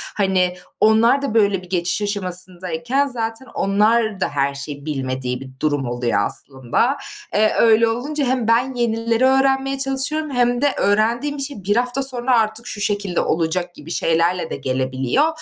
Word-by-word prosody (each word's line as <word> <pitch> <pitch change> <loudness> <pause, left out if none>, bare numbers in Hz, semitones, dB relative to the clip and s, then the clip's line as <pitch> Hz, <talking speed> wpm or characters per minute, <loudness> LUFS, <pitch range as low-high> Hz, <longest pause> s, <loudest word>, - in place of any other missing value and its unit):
Hani, 185 -3 +1 0.2
onlar 225 +5 +4
da 275 -6 -3
böyle 200 -4 +2
bir 180 - -15
geçiş 180 +2 0
aşamasındayken 185 +5 -1
zaten 230 -1 -2
onlar 215 +1 +1
da - - 0
her 140 -1 0
şeyi 140 +1 -7
bilmediği 130 -3 -3
bir 135 - -9
durum 145 -3 0
oluyor 120 -3 -1
aslında. 135 - -1 0.4
Eee, 215 +1 +3
öyle 230 0 +5
olunca 275 +6 -1
hem 250 -3 0
ben 245 +3 +2
yenileri 230 0 0
öğrenmeye 270 0 +2
çalışıyorum 275 +3 0
hem 245 -1 +1
de 285 -1 +2
öğrendiğim 230 +8 +1
bir - - -2
şey 275 -8 -4
1 205 +3 +1
hafta 250 +3 0
sonra 250 -2 +1
artık 220 +2 -2
şu 205 - -4
şekilde 205 -3 0
olacak 175 +2 -1
gibi 150 +3 -9
şeylerle 165 +1 +1
de - - -4
gelebiliyor. 130 - 0
215 Hz, 160 wpm, -20 LUFS, 170-245 Hz, 0.4 s, öyle